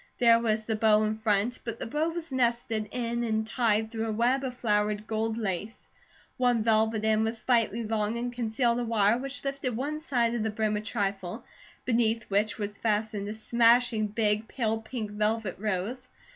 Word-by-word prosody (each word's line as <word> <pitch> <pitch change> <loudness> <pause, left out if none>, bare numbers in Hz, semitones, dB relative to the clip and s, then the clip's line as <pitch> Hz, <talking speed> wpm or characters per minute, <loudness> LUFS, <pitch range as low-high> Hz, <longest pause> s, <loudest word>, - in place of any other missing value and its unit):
There 230 -2 +6
was 220 -2 0
a 220 - 0
bow 215 -1 +4
in 215 0 +1
front, 220 +2 0
but 230 -1 -4
the - - -5
bow 300 +7 0
was 335 -2 -6
nested 235 -4 0
in 235 0 -2
and 220 -1 0
tied 220 -1 +1
through 225 -1 -2
a - - -1
web 245 +5 +1
of 250 -2 -4
flowered 210 -2 0
gold 220 0 -1
lace. 210 0 -4 0.5
One 245 -3 +2
velvet 220 -1 +2
end 220 0 +3
was 225 +1 -1
slightly 230 -1 +1
long 215 0 -1
and 245 +1 -3
concealed 235 0 0
a - - -1
wire 225 0 +2
which 275 +1 -4
lifted 275 -4 -2
one 295 +4 -2
side 245 -7 0
of 240 - -1
the 220 - 0
brim 215 0 0
a 210 - -2
trifle, 200 -2 -3 0.4
beneath 230 -2 +1
which 205 +2 +1
was 205 -2 -5
fastened 210 -2 -1
a 210 - -4
smashing 230 0 +3
big, 210 0 0
pale 225 -3 -1
pink 220 -2 -5
velvet 210 -1 -1
rose. 215 +5 -3
225 Hz, 185 wpm, -28 LUFS, 215-240 Hz, 0.5 s, There